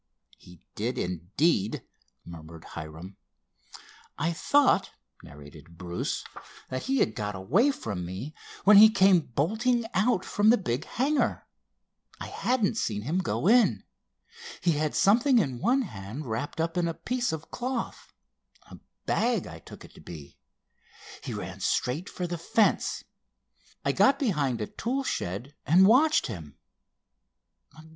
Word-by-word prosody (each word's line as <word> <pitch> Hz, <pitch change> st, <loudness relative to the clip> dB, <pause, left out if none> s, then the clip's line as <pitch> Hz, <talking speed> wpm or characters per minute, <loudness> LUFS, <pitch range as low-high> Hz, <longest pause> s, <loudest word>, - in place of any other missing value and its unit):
"He 90 Hz, 0 st, -17 dB
did, 120 Hz, +5 st, -3 dB
indeed!" 95 Hz, -, 0 dB, 0.4 s
murmured 80 Hz, -1 st, -11 dB
Hiram. 85 Hz, +4 st, -9 dB, 1.0 s
"I 165 Hz, +4 st, 0 dB
thought," 285 Hz, -, +3 dB, 0.3 s
narrated 75 Hz, +4 st, -14 dB
Bruce, 85 Hz, -1 st, -3 dB, 0.5 s
"that 130 Hz, -, -4 dB
he 270 Hz, +1 st, 0 dB
had 110 Hz, -, +1 dB
got 105 Hz, -1 st, -4 dB
away 145 Hz, -, +2 dB
from 100 Hz, -, -4 dB
me, 95 Hz, -, -6 dB, 0.3 s
when 205 Hz, 0 st, +8 dB
he 215 Hz, +2 st, +10 dB
came 195 Hz, -3 st, +5 dB
bolting 220 Hz, -, 0 dB
out 190 Hz, 0 st, +1 dB
from 205 Hz, +1 st, +2 dB
the 240 Hz, -, +6 dB
big 120 Hz, -, -3 dB
hangar. 280 Hz, +4 st, 0 dB, 0.7 s
I -, -, -5 dB
hadn't 235 Hz, -4 st, 0 dB
seen 105 Hz, -, -2 dB
him 160 Hz, +9 st, -1 dB
go 185 Hz, -, -2 dB
in. 235 Hz, +2 st, +4 dB, 0.8 s
He 175 Hz, -, +2 dB
had 150 Hz, -1 st, -1 dB
something 240 Hz, +6 st, +4 dB
in 135 Hz, -, 0 dB
one 255 Hz, +7 st, +2 dB
hand 110 Hz, -, -7 dB
wrapped 120 Hz, +7 st, -4 dB
up 165 Hz, +1 st, -1 dB
in 175 Hz, -1 st, +1 dB
a 165 Hz, -, -3 dB
piece 250 Hz, 0 st, -2 dB
of 160 Hz, -1 st, -7 dB
cloth, 250 Hz, -1 st, -4 dB, 0.6 s
a -, -, -11 dB, 0.3 s
bag 235 Hz, -5 st, +1 dB
I 85 Hz, -, -9 dB
took -, -, -13 dB
it -, -, -17 dB
to -, -, -15 dB
be. 75 Hz, -5 st, -11 dB, 0.9 s
He -, -, -5 dB
ran -, -, -6 dB
straight 150 Hz, +10 st, -1 dB
for 180 Hz, -, -4 dB
the 175 Hz, -1 st, -4 dB
fence. 210 Hz, +5 st, +1 dB, 0.8 s
I -, -, +3 dB
got 270 Hz, +1 st, +4 dB
behind 145 Hz, -, 0 dB
a -, -, -1 dB
tool 260 Hz, -, -3 dB
shed 110 Hz, -, -4 dB
and 175 Hz, +7 st, +5 dB
watched 285 Hz, +9 st, +4 dB
him." 80 Hz, -, -8 dB
160 Hz, 140 wpm, -27 LUFS, -, 1.0 s, he